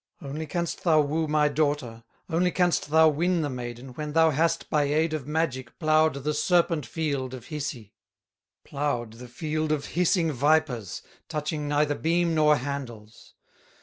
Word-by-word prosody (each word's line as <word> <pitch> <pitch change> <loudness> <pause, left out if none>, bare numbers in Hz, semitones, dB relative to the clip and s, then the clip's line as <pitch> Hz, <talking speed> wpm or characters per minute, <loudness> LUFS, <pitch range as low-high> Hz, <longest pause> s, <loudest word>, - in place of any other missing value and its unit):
Only 155 +1 -6
canst 170 +2 -3
thou 160 -3 +4
woo 155 +2 -1
my 150 0 +3
daughter, 145 -6 -1 0.2
Only 180 +1 +1
canst 175 -4 +1
thou 160 +1 +6
win 170 +3 +1
the 145 - -2
maiden, 120 0 -7
When 150 +4 -6
thou 160 0 +5
hast 165 +3 0
by 150 -2 +1
aid 155 +3 +1
of 145 -4 -4
magic 150 -6 -2
Plowed 155 -1 +3
the 150 +1 0
serpent 165 -3 +1
field 140 -4 -3
of 125 +2 -12
Hisi, 135 -8 -5 0.7
Plowed 140 -6 -3
the 125 - -9
field 155 +5 -3
of 150 -2 -1
hissing 170 -1 +2
vipers, 140 - 0 0.3
Touching 150 -1 -3
neither 145 0 +1
beam 170 +2 +1
nor 150 -1 +4
handles. 125 -6 -7
150 Hz, 155 wpm, -26 LUFS, 135-160 Hz, 0.7 s, thou